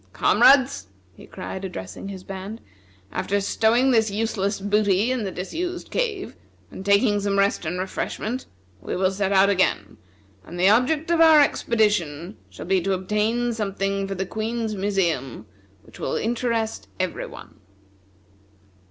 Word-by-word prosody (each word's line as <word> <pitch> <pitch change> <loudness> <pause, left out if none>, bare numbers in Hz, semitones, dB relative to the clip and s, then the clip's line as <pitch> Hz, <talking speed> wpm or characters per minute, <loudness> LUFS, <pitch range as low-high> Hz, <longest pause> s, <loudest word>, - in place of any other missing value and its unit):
"Comrades!" 270 - +4 0.3
he - - -15
cried, 190 0 -7
addressing 175 - -7
his 190 -2 -8
band, 195 +4 -7 0.5
"after 205 +1 -1
stowing 225 +6 +2
this 220 -3 +3
useless 205 -1 -1
booty 205 +2 +2
in 250 -5 -1
the 190 - -3
disused 350 - -5
cave, 435 -6 -2 0.4
and - - -8
taking 205 +1 +3
some 200 0 -1
rest 200 -4 +1
and 175 +3 -2
refreshment, 215 +6 -4 0.3
we - - -4
will 185 +1 +1
set 195 0 -1
out 195 0 +5
again, 180 - 0 0.5
and 175 +2 -9
the 185 - +4
object 285 +9 +2
of 335 -1 +3
our 320 -2 +8
expedition 205 - +1
shall - - -9
be 190 +1 +2
to 195 +2 0
obtain 210 +6 0
something 195 -2 -2
for 195 - -4
the 190 +1 -2
Queen's 220 +2 -3
museum 175 - -1 0.4
which - - -16
will - - -2
interest 225 - -2
every - - -2
one." - - -13
200 Hz, 145 wpm, -23 LUFS, 190-230 Hz, 0.5 s, our